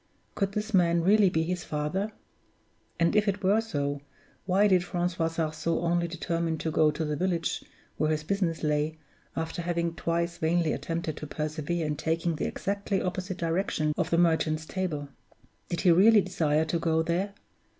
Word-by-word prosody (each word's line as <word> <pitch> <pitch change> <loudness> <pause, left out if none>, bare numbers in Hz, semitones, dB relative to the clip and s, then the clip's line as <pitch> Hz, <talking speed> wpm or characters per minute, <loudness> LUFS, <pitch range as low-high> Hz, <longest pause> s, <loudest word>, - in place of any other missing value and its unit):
Could 195 0 -1
this 215 +2 -3
man 170 -2 +4
really 200 +1 +5
be 160 -2 +1
his 180 +2 -2
father? 155 +8 -2 0.9
And 170 +4 +3
if 210 0 +3
it 200 0 -1
were 200 +4 +4
so, 145 -9 -2 0.5
why 195 +3 +4
did 185 -3 +4
Francois 175 -2 -1
Sarzeau 165 0 -1
only 170 0 +1
determine 165 -1 -2
to 160 - -2
go 155 0 +4
to 150 +1 -2
the 150 0 -1
village 175 +1 -1 0.3
where 155 - +1
his 155 -1 0
business 175 -2 -1
lay, 150 +1 0 0.4
after 160 +1 -3
having 170 -1 -1
twice 170 +1 -1
vainly 165 0 +2
attempted 165 -2 -3
to 150 - -6
persevere 155 +2 -2
in 150 -1 -2
taking 165 +1 -1
the - - -1
exactly 200 0 -2
opposite 185 0 -3
direction 165 -3 0
of - - -1
the 170 - +2
Merchant's 160 -2 +2
Table? 160 -6 -3 0.6
Did 170 - -2
he 180 - +5
really 205 +5 +7
desire 160 -5 +1
to 165 +1 -1
go 160 -1 +1
there? 185 +5 -1
170 Hz, 170 wpm, -28 LUFS, 160-185 Hz, 0.9 s, really